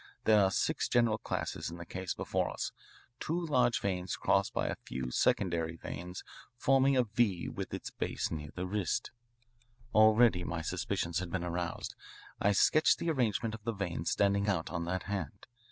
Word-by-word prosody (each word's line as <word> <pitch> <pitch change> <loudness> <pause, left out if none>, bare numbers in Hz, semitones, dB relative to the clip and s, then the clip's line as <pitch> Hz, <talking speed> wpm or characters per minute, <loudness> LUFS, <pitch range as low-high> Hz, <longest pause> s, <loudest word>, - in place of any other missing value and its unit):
There 105 -2 +5
are 95 - +4
six - - 0
general 115 -2 +3
classes - - -3
in 85 - -8
this 85 - -8
case 95 -1 -4
before - - -1
us, - - -3 0.5
two 165 +3 -1
large 125 -8 +2
veins 90 -2 -2
crossed - - +2
by - - -1
a - - -1
few 65 -1 -4
secondary 85 +1 +1
veins 90 +2 -7 0.3
forming 135 +2 +3
a 125 - +5
V 105 -5 0
with - - -5
its - - -5
base - - -2
near 75 -2 -4
the 90 - -3
wrist. 100 0 -1 0.8
"Already 110 -3 +5
my 85 -1 -3
suspicions 85 +2 -1
had 90 -1 -4
been 90 0 -2
aroused. 85 -1 -3 0.5
I 105 - +4
sketched 155 +10 +4
the 170 - 0
arrangement 115 -5 0
of 110 -1 -8
the 115 +1 -1
veins 85 -5 -2
standing 100 0 +2
out 85 -5 -1
on 85 -1 -2
that 90 +2 -2
hand. 100 -8 -4
95 Hz, 175 wpm, -32 LUFS, 85-115 Hz, 0.8 s, There